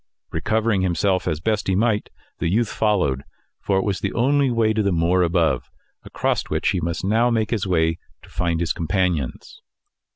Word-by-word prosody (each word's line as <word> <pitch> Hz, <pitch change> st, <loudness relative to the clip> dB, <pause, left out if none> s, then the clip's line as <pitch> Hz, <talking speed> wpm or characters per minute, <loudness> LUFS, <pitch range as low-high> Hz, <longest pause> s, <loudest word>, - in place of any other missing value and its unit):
Recovering 110 Hz, -2 st, 0 dB
himself 95 Hz, +1 st, +1 dB
as 80 Hz, -, 0 dB
he -, -, -13 dB
best 105 Hz, -3 st, 0 dB
might, 105 Hz, +3 st, +1 dB, 0.3 s
the 85 Hz, -, 0 dB
youth 110 Hz, +4 st, +1 dB
followed, 90 Hz, -12 st, +1 dB, 0.4 s
for 95 Hz, -, +1 dB
it 95 Hz, -, +1 dB
was 100 Hz, -3 st, -1 dB
the -, -, -2 dB
only 140 Hz, +3 st, +2 dB
way 115 Hz, -2 st, +2 dB
to 110 Hz, -, +1 dB
the 100 Hz, -1 st, +1 dB
moor 85 Hz, +2 st, +2 dB
above, 85 Hz, -1 st, +1 dB, 0.3 s
across -, -, -1 dB
which -, -, -1 dB
he 95 Hz, -3 st, 0 dB
must 85 Hz, +2 st, -3 dB
now 115 Hz, +4 st, +3 dB
make 110 Hz, -3 st, 0 dB
his 105 Hz, -4 st, -1 dB
way 80 Hz, -2 st, +1 dB, 0.2 s
to -, -, -16 dB
find 85 Hz, -1 st, -1 dB
his 85 Hz, -2 st, 0 dB
companions. 85 Hz, -5 st, -2 dB
95 Hz, 185 wpm, -22 LUFS, 85-110 Hz, 0.4 s, now